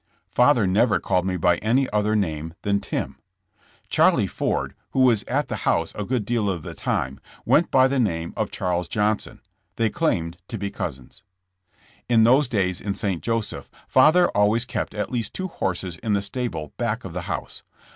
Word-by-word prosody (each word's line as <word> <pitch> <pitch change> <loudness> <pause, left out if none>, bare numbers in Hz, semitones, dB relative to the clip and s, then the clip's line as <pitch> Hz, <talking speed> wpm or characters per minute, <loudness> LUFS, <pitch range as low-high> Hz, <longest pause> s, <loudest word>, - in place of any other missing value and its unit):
'' - - -45
Father 125 -3 +4
never 105 +1 +3
called 90 +1 0
me 90 -1 -1
by 90 0 +3
any 125 +7 +1
other 105 +1 +1
name 80 -5 -2
than 100 0 +1
''Tim." 65 -8 -4 0.7
Charlie - - +4
Ford, - - -2 0.2
who 135 - +2
was 120 -5 +4
at - - -1
the - - -3
house - - 0
a 105 - -4
good 120 -1 -1
deal 115 -2 0
of 85 -5 -3
the - - -7
time, 65 +1 -2 0.3
went 170 - +3
by 130 0 +5
the 135 0 0
name 85 -8 -1
of - - -1
Charles 90 -2 -2
Johnson. 105 +2 -1 0.3
They 115 -2 +1
claimed 85 - -1
to 115 - -5
be 100 0 -4
cousins. 65 -1 -6 0.9
In 115 -2 +5
those 130 +5 +5
days 95 -6 0
in 100 -1 -3
St. 95 -4 -2
Joseph, 115 -2 -3 0.2
father 155 +7 +5
always 105 +4 +2
kept 115 - -4
at 105 -1 -3
least 115 -4 -3
two 185 0 -3
horses 90 - -3
in 110 -2 -2
the 100 -1 +1
stable 100 - -4
back - - -2
of - - -7
the - - -3
house. - - -4
105 Hz, 185 wpm, -24 LUFS, 90-120 Hz, 0.9 s, by